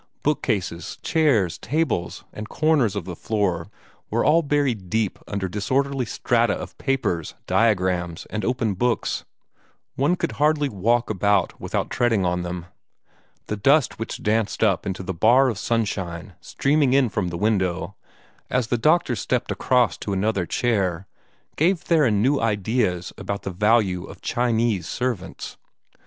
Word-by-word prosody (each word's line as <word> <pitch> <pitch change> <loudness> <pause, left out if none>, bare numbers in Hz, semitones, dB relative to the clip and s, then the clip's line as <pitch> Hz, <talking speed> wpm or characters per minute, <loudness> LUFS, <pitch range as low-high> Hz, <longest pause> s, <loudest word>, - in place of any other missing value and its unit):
Bookcases, 110 - -1
chairs, 115 - +2
tables, 130 - -1
the - - -7
corners 150 -10 +2
of 100 -4 -3
the 90 - -6
floor, 95 -5 -1 0.4
were 115 +2 +1
all 160 +3 +5
buried 140 - 0
deep 110 -2 0
under 100 -2 -2
disorderly 130 +7 0
strata - - +1
of - - -7
papers, 105 - -1
diagrams, 90 -6 +1
and 110 - -3
opened 115 -6 -1
books. 120 -3 0 0.7
One 145 +7 +2
could - - -2
hardly 150 -1 +2
walk 115 +3 +1
about 100 -1 +1
without - - -2
treading 115 -6 +2
on 90 0 0
them. 90 -1 -5 0.8
The 105 - -3
dust 135 +6 +3
which 115 - -5
danced 110 +1 0
up 100 -5 +2
into 95 -1 -3
the 95 0 -3
bar 120 +9 +4
of 110 -5 -4
sunshine 95 -7 -2
streaming 140 -2 +1
in 135 -2 +4
from 105 -3 -2
the 85 -1 -4
window, 95 -2 0 0.5
as 125 -3 0
the 120 - +1
doctor 155 -2 +3
stepped 125 +1 -1
across 125 -3 +2
to 100 - -3
another 95 -2 0
chair, 95 -7 0 0.5
gave 175 +3 +3
Theron 130 -13 +2
new 140 +2 +3
ideas 105 -4 0
about 100 0 -4
the 95 - -3
value 100 -2 +2
of - - -12
Chinese 115 - 0
servants. 115 - -4
110 Hz, 145 wpm, -23 LUFS, 95-130 Hz, 0.8 s, all